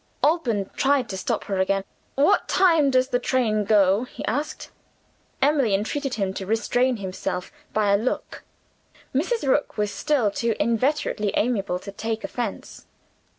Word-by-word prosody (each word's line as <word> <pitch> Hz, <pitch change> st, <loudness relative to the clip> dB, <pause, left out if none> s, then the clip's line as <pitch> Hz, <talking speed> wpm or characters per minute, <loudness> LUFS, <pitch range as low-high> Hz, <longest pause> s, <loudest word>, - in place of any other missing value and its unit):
Alban 250 Hz, -, +1 dB
tried 275 Hz, -2 st, +2 dB
to 190 Hz, -, -4 dB
stop 185 Hz, -, -2 dB
her 195 Hz, -2 st, -3 dB
again. 195 Hz, +1 st, +1 dB, 0.3 s
"What 295 Hz, +9 st, +3 dB
time 330 Hz, -6 st, +4 dB
does 255 Hz, 0 st, +2 dB
the 245 Hz, -2 st, +1 dB
train 225 Hz, -5 st, +1 dB
go?" 200 Hz, +1 st, +4 dB
he -, -, -8 dB
asked. 290 Hz, +8 st, -3 dB, 0.7 s
Emily 275 Hz, -8 st, +3 dB
entreated 265 Hz, +7 st, -2 dB
him 195 Hz, -3 st, -1 dB
to 190 Hz, -1 st, -6 dB
restrain 245 Hz, +3 st, +1 dB
himself, 185 Hz, -2 st, -4 dB, 0.2 s
by 210 Hz, -2 st, +2 dB
a -, -, +5 dB
look. 230 Hz, +5 st, -3 dB, 0.7 s
Mrs. 350 Hz, -, 0 dB
Rook 290 Hz, +2 st, +1 dB
was 210 Hz, -1 st, 0 dB
still 280 Hz, -9 st, +1 dB
too 230 Hz, +2 st, -1 dB
inveterately 230 Hz, -1 st, 0 dB
amiable 205 Hz, -6 st, 0 dB
to 200 Hz, +2 st, -9 dB
take 225 Hz, +2 st, -4 dB
offense. 235 Hz, -5 st, -5 dB
230 Hz, 150 wpm, -24 LUFS, 200-275 Hz, 0.7 s, a